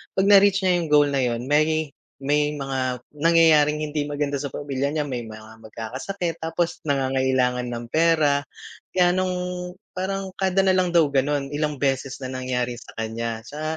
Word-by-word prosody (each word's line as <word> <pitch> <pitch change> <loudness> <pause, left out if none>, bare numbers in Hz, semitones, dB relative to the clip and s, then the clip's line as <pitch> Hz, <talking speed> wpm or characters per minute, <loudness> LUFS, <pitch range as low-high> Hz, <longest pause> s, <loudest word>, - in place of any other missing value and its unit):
'pag 190 +1 +2
na-reach 200 -1 +6
niya 180 - +4
yung 165 - -3
goal 145 -1 +6
na 140 -1 0
yun, 120 0 -2
may 155 +1 +2 0.3
may 150 +2 +1
mga 130 -3 -3 0.2
nangyayaring 155 -2 +4
hindi 150 -1 -2
maganda 145 -1 -2
sa 140 -1 -5
pamilya 140 0 -2
niya, 155 - 0
may 120 -3 -4
mga 110 0 -11
magkakasakit 145 - -5
tapos 165 +1 -2
nangangailangan 130 -3 +1
ng 120 -1 -5
pera, 155 -3 +3 0.5
gano'ng 180 0 +2 0.6
parang 190 +1 -3
kada 190 0 +2
nalang 185 -1 +3
daw 165 -3 +6
ganun, 140 +1 0
ilang 150 0 -1
beses 135 -1 -1
na 130 - -5
nangyari 125 -1 -2
sa - - -16
kaniya 115 0 -4
sa 155 +4 -4
145 Hz, 155 wpm, -23 LUFS, 130-165 Hz, 0.6 s, na-reach